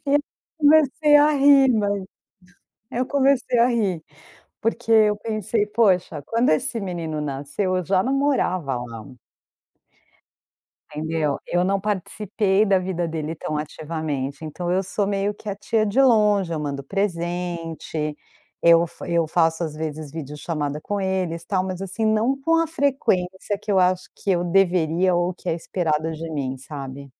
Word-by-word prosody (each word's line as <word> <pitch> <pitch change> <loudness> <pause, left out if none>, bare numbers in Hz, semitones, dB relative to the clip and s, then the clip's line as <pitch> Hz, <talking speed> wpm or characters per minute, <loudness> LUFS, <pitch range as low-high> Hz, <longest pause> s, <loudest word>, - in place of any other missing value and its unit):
eu 290 +1 +3 0.4
comecei 300 0 +5
a 295 +1 +5
rir, 280 -1 +6
mas 205 -2 0 0.9
eu 250 +2 -1
comecei 270 -2 +2
a 240 - +5
rir, 195 -9 0 0.6
porque 230 +1 -1
eu 215 -2 +5
pensei 215 -1 -1
poxa, 190 -8 +1
quando 230 +6 +1
esse 155 +9 +1
menino 165 -5 -4
nasceu 145 +7 -2
eu 180 - -3
já 185 +1 +2
não 265 - 0
morava 185 - 0
lá. 115 -3 -7 1.9
Entendeu? 155 -1 -1
Eu 175 0 +1
não 195 +2 +1
participei 205 0 0
da 195 -2 +3
vida 180 -2 -2
dele 160 0 -4
tão 155 -1 -4
ativamente 150 -2 -4
então 175 +3 -4
eu 190 +2 +1
sou 195 +2 -2
meio 200 0 0
que 210 +1 -8
a 200 - -3
tia 215 +2 0
de 210 +5 0
longe, 210 -7 +3
eu 155 - -2
mando 140 -2 -4
presente, 170 -3 -3 0.5
eu 170 0 +6
fa 165 - -10
eu 170 -1 +1
faço 165 +1 +1
às 155 -2 -4
vezes 155 -1 -5
video 150 -2 -7
chamada 150 -2 -3
com 205 +5 -3
eles 185 -3 -2
tal, 185 +1 0
mas 185 0 -5
assim 195 +4 -3
não 220 +5 +1
com 330 +4 +2
a 330 - 0
frequência 205 - 0
que 210 - -3
eu 195 - +4
acho 185 0 +1
que - - -5
eu 175 -1 +1
deveria 180 -1 +2
ou 175 +1 0
que 180 - -6
é - - +1
esperada 160 -2 -1
de 160 +1 -6
mim 135 -4 -3
sabe. 135 0 -8
185 Hz, 160 wpm, -23 LUFS, 160-215 Hz, 1.9 s, rir